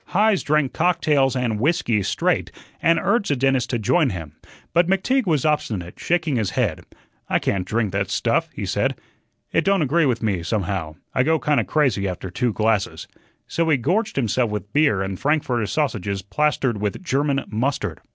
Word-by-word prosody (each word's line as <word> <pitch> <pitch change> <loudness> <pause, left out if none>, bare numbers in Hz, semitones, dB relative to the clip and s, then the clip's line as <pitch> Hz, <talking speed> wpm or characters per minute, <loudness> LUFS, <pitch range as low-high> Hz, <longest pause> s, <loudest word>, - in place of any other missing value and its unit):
Heise 210 -1 +4
drank 150 -3 +1
cocktails 155 -6 +2
and 120 -4 -1
whiskey 120 -6 +1
straight, - - 0 0.3
and 165 0 +4
urged 230 -3 +1
the 145 - +2
dentist 130 -1 +1
to 120 - 0
join 140 +7 +2
him. 80 -8 -6 0.4
But 175 +1 +4
McTeague 200 +6 +1
was 155 -5 +1
obstinate, 105 - -1
shaking 165 -6 0
his 105 -4 0
head. - - -1 0.5
"I - - +3
can't 95 -2 -1
drink 110 -1 0
that 100 0 -1
stuff," 100 - 0
he - - -5
said. - - 0 0.6
"It 165 - +2
don't 195 -1 +2
agree 150 +2 +2
with 120 -2 -1
me, 100 -5 0
somehow; 90 -4 -2 0.2
I - - +2
go 160 +5 +3
kinda 150 -1 +1
crazy 130 -10 +1
after 90 0 -5
two 120 +6 0
glasses." 110 -2 0 0.4
So 165 -1 -1
he 150 - +4
gorged 195 - 0
himself 120 -2 +1
with 105 0 -5
beer 145 -10 +3
and 95 -1 -4
frankfurter 130 -6 0
sausages 100 - -1
plastered 130 0 0
with 105 - -3
German 140 -3 0
mustard. 125 +6 -2
130 Hz, 175 wpm, -22 LUFS, 105-155 Hz, 0.6 s, Heise